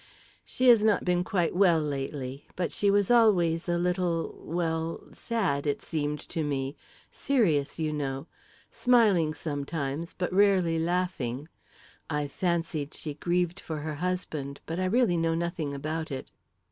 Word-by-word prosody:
"She 255 0 +2
has 230 -3 +7
not 215 -3 +3
been 180 -1 +2
quite 180 -4 0
well 180 -4 +5
lately; 135 -2 -4
but 175 -2 -1
she 205 - +1
was 200 +2 +3
always 180 -8 +4
a 175 - +2
little 175 -1 0
well 165 -1 -2
sad, 180 -12 -1
it 145 - -1
seemed 150 -2 -2
to 160 - -2
me; 140 -1 -2 0.4
serious, 175 - +1
you 155 -2 -1
know; 135 -1 -3 0.5
smiling 205 -11 +3
sometimes, 145 +1 -4
but 180 0 -2
rarely 185 -4 +4
laughing. 160 -6 -1 0.6
I've 145 -2 -2
fancied 165 -5 -1
she 150 - -5
grieved 175 +3 0
for 160 - -5
her 155 0 -3
husband; 155 -6 -3
but 165 +2 -3
I 185 - +1
really 210 -2 +3
know 165 0 +1
nothing 170 -3 -2
about 155 +3 -3
it." 135 -2 -6
165 Hz, 145 wpm, -28 LUFS, 150-180 Hz, 0.6 s, has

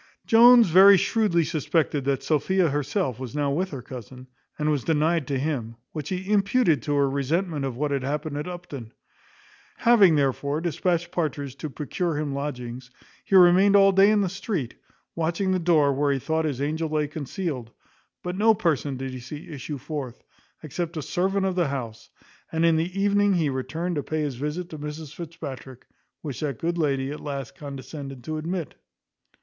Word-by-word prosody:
Jones 235 0 +7
very 190 +4 +8
shrewdly 185 -4 +2
suspected 155 -3 0
that 140 -1 0
Sophia 170 +3 +2
herself 135 -4 -1
was 130 -1 -7
now 145 -1 0
with 180 +6 -1
her 135 -7 -7
cousin, 125 0 -10 0.3
and 150 0 +1
was 145 -4 0
denied 160 -2 +1
to 140 - -1
him; 130 -5 -2 0.2
which 150 -2 -5
he 185 +2 -3
imputed 200 - +3
to 145 +5 -1
her 140 -1 +3
resentment 145 +3 -1
of 130 -3 -4
what 150 +1 -1
had 140 -1 0
happened 150 +2 -3
at 150 +3 -4
Upton. 145 -10 -8 0.8
Having, 210 -8 +5
therefore, 140 +1 0
dispatched 170 +1 -1
Partridge 145 -6 -3
to 155 - -5
procure 155 +3 -3
him 150 -2 -2
lodgings, 125 -3 -5 0.3
he 195 - 0
remained 185 +2 +7
all 195 -1 +7
day 195 +1 +5
in 210 -1 +3
the 195 - +1
street, 185 - -3 0.4
watching 170 +4 -1
the 185 - +1
door 160 -5 +3
where 140 +1 +1
he 140 - +1
thought 160 +4 -1
his 140 -4 -2
angel 160 +2 -1
lay 150 -1 0
concealed; 145 - -4 0.5
but 180 0 -3
no 220 +3 +4
person 150 -7 0
did 135 0 -5
he 130 - -7
see 145 +5 -9
issue 145 0 -6
forth, 135 -3 -6 0.4
except 165 +3 -4
a 155 - -3
servant 190 +6 0
of 190 - 0
the 175 -3 +1
house, 115 -5 -5 0.4
and 165 +1 +1
in 165 -1 +4
the 175 +4 -1
evening 205 0 +3
he 160 -4 +1
returned 160 +6 -3
to - - 0
pay 155 +2 -3
his 145 -3 -2
visit 150 +7 -4
to 155 - -7
Mrs 150 0 -7
Fitzpatrick, 135 -6 -8 0.4
which 145 -6 -5
that 140 -5 -3
good 170 +4 -2
lady 135 -3 0
at 150 - -6
last 140 -4 -5
condescended 140 -2 -8
to 155 +4 -4
admit. 170 +1 -4
155 Hz, 185 wpm, -25 LUFS, 140-175 Hz, 0.8 s, very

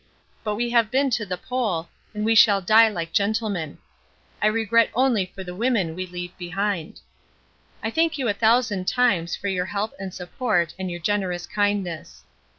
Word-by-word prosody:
But 210 -2 -1
we 240 +2 -1
have 230 -3 +3
been 270 +2 +1
to 225 -3 -1
the 180 -1 -3
Pole 210 -8 -2 0.3
and 210 0 -2
we 225 - +3
shall 205 -2 +6
die 220 +4 +6
like 170 -5 -5
gentlemen. 200 -6 -1 0.6
I 210 - +4
regret 225 +1 +3
only 240 -7 +2
for 190 +1 -9
the 180 -1 -7
women 210 -5 0
we 185 +2 -5
leave 175 0 -7
behind. 180 -1 -3 0.8
I 220 - -1
thank 325 +4 +1
you 260 -3 -1
a 205 - +2
thousand 220 -3 +2
times 190 -10 +2
for 205 - -5
your 185 -2 0
help 205 +2 -3
and 195 -1 -5
support 180 -1 -1
and 190 -1 -3
your 175 0 -5
generous 180 -2 -1
kindness. 200 -6 -2
205 Hz, 175 wpm, -24 LUFS, 180-225 Hz, 0.8 s, shall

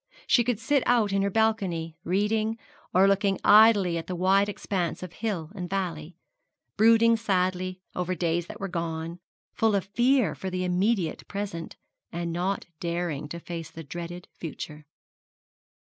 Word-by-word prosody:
She 240 - +4
could 235 -2 -1
sit 280 +4 +2
out 225 -5 +3
in 195 - +2
her 200 - +1
balcony, 195 -7 0
reading, 215 +4 0 0.3
or 190 +2 +5
looking 195 0 +2
idly 205 -5 +6
at 165 - -8
the 185 - -3
wide 195 +3 +3
expanse 185 -4 -3
of 180 -2 -8
hill 195 -8 -3
and 180 -4 -6
valley, 175 -4 -3 0.6
brooding 230 +2 +5
sadly 185 -3 -1
over 180 0 -1
days 170 0 -1
that - - -9
were 195 - -3
gone, 165 -1 -4 0.3
full 220 -2 +2
of 195 - 0
fear 240 - +2
for 190 - -5
the 185 0 -2
immediate 180 0 0
present, 200 -5 -5 0.4
and 170 0 -3
not 185 +3 -1
daring 170 -4 -3
to 170 - -6
face 165 -1 -6
the 165 0 -9
dreaded 175 +3 -7
future. 150 -2 -8
185 Hz, 155 wpm, -27 LUFS, 170-205 Hz, 0.6 s, idly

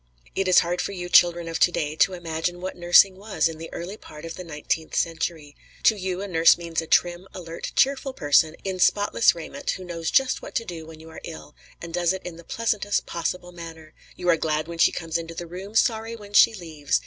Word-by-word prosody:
It 195 - -1
is 185 - +6
hard 175 +1 -1
for 200 - -4
you 175 -2 -6
children 175 -1 +5
of 165 - -3
to 175 - +5
day 155 -3 -2
to 190 - +3
imagine 175 0 -3
what 185 +1 -5
nursing 180 +2 +5
was 205 -3 0
in 160 -1 -7
the 165 - -8
early 185 +5 -6
part 150 -5 -12
of 165 - -6
the 180 - -8
nineteenth 160 0 -3
century. 160 -3 -2 0.3
To 220 - +5
you 185 -2 -3
a - - -4
nurse 165 -3 +5
means 170 -1 -3
a 160 - -9
trim, 175 +3 +2
alert, 165 -2 -6
cheerful 270 0 +2
person 155 - +2
in 190 -1 -3
spotless 205 +3 +3
raiment, 275 - -7
who 185 - -2
knows 165 -2 -4
just 265 -1 +2
what - - -10
to 230 - -1
do 165 -5 -8
when 160 -1 -12
you 160 +1 -13
are - - -10
ill, 160 -2 -9 0.2
and 170 0 -9
does 175 0 +1
it 190 - -7
in 180 -2 -6
the 170 - -13
pleasantest 210 0 -1
possible 180 +1 -4
manner; 165 -2 -11 0.2
you 180 - -6
are 170 -2 +5
glad 155 -1 -1
when 170 0 -8
she - - +5
comes 165 0 -3
into 165 0 -8
the 175 - -5
room, 185 +5 -9
sorry 225 0 +1
when 205 -2 -13
she 225 +2 +6
leaves. 155 - -2
175 Hz, 230 wpm, -24 LUFS, 165-190 Hz, 0.3 s, is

